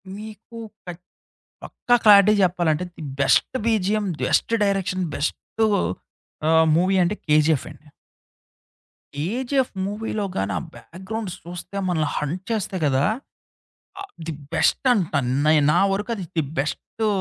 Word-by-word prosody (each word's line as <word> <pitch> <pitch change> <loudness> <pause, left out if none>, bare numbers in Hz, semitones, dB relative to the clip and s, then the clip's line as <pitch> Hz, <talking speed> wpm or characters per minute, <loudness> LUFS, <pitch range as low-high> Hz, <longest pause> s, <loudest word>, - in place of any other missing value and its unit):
మీకు 220 +2 -10 0.3
క 175 - -6 0.7
పక్కా 245 - 0
క్లారిటీ 205 -1 +7
జెప్పాలంటే, 175 -2 +1
the 160 - -9 0.2
best 140 - +3
BGM, 210 -2 +1
best - - +1
direction, 190 -2 0
best 220 +8 -1 0.8
ఆహ్, 160 0 +5
మూవీ 185 +3 +2
అంటే 175 +4 +1
'కేజీఎఫ్' 150 -1 +3
అండి. 150 - -16 1.3
'కేజిఎఫ్' 245 - -1
మూవీలో 210 +1 -3
గాని 95 +1 -1
ఆ - - -7
బ్యాక్గ్రౌండ్ 190 +3 -7
చూస్తే 175 +3 -7
మనల్ని 155 -4 0
హంట్ 170 +6 -3
చేస్తాయి 195 -5 -2
కదా! 135 -1 +2 1.0
ఆహ్, 400 - -8 0.2
ది 160 - -2 0.2
బెస్ట్ 175 - +2
అంట. 185 -8 -1 0.3
నై 155 0 +5
నా 175 - +3
వరకు 205 +4 -3
అది 190 - -6
ది 160 - +3 0.2
బెస్టూ 215 +9 -2
185 Hz, 125 wpm, -23 LUFS, 160-215 Hz, 1.3 s, క్లారిటీ